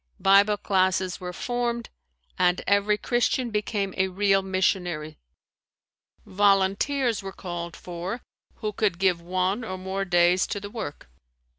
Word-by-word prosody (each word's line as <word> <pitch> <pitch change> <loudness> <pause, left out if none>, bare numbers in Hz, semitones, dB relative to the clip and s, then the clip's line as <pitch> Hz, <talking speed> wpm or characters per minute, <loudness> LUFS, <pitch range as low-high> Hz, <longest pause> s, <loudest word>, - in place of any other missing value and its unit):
Bible 200 +2 +5
classes 185 -2 +1
were 180 -1 -5
formed 240 +3 -3 0.4
and 180 0 +2
every 200 +1 +3
Christian 240 +1 0
became 210 -2 -1
a 190 - +2
real 195 +1 +2
missionary. 180 -5 -1 1.1
Volunteers 205 +6 +2
were 195 0 -6
called 175 -3 -6
for, 180 +6 -6 0.3
who 215 -1 -4
could 200 -4 0
give 185 -2 +2
one 185 +5 -1
or 185 -4 -5
more 190 +1 -3
days 175 0 +3
to 205 - -3
the 205 0 -8
work. 215 - -6
195 Hz, 130 wpm, -26 LUFS, 180-210 Hz, 1.1 s, Bible